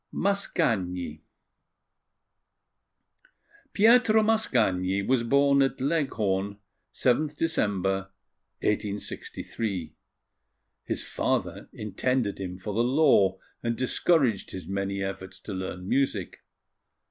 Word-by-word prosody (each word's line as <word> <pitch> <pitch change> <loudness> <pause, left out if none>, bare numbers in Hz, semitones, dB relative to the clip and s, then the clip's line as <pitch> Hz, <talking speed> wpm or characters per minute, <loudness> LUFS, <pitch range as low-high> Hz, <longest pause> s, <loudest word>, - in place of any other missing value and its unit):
MASCAGNI 95 - -1 2.5
PIETRO 220 0 +5
MASCAGNI 105 - +1
was 130 -2 +2
born 140 +3 +4
at 135 0 +1
Leghorn, 110 -10 0 0.3
7th 145 +4 +1
December, 95 - 0 0.5
1863. 100 -3 -3 0.9
His - - -2
father - - -2
intended 105 +2 -1
him 90 -1 -5
for 100 +2 -5
the 115 +3 +2
law, 120 -8 +4 0.2
and 115 0 -1
discouraged 130 - +2
his 90 -3 -7
many 100 0 -2
efforts 95 0 -6
to 105 - -6
learn 95 -1 -5
music. 110 -7 0
105 Hz, 90 wpm, -27 LUFS, 95-140 Hz, 2.5 s, PIETRO